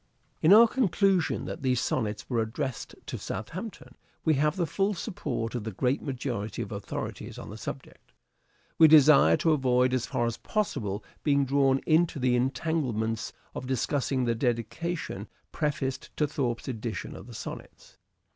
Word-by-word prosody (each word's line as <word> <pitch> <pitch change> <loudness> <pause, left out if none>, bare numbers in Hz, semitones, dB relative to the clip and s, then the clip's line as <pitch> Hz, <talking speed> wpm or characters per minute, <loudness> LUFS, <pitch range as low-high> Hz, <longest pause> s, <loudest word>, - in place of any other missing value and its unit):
In 160 - +5
our 225 +3 +9
conclusion 195 - +1
that - - -6
these 130 -2 +1
Sonnets 105 -4 -2
were 120 -3 +1
addressed 110 +3 -4
to - - -5
Southampton, 165 - -6 0.3
we 160 - +4
have 150 +3 +2
the 180 -3 0
full 195 +6 0
support 170 - -3
of 120 -3 -3
the 110 - -3
great 125 +7 0
majority 120 -5 -3
of 100 - -10
authorities 100 -1 -5
on - - -8
the - - -7
subject. - - -8
w. - - -31
H. - - -41
and - - -40
We 160 - +9
desire 145 - +7
to 165 - +2
avoid 130 -3 +3
as 130 -2 0
far 120 - 0
as 115 -1 -2
possible 115 - -2 0.2
being 140 -2 +2
drawn 135 0 +3
Dedication.6 155 +4 +3
m*° 165 -5 -1
tne 125 -1 +3
entanglements 125 -4 -1 0.2
of 125 - -6
discussing 130 0 0
the 120 - +2
dedication 125 +9 -2 0.2
prefaced 140 -4 -2
to 150 - +3
Thorpe's 130 -5 -2
edition 115 -5 -4
of 95 - -10
the 120 - -10
Sonnets. - - -9
130 Hz, 170 wpm, -28 LUFS, 120-155 Hz, 0.3 s, our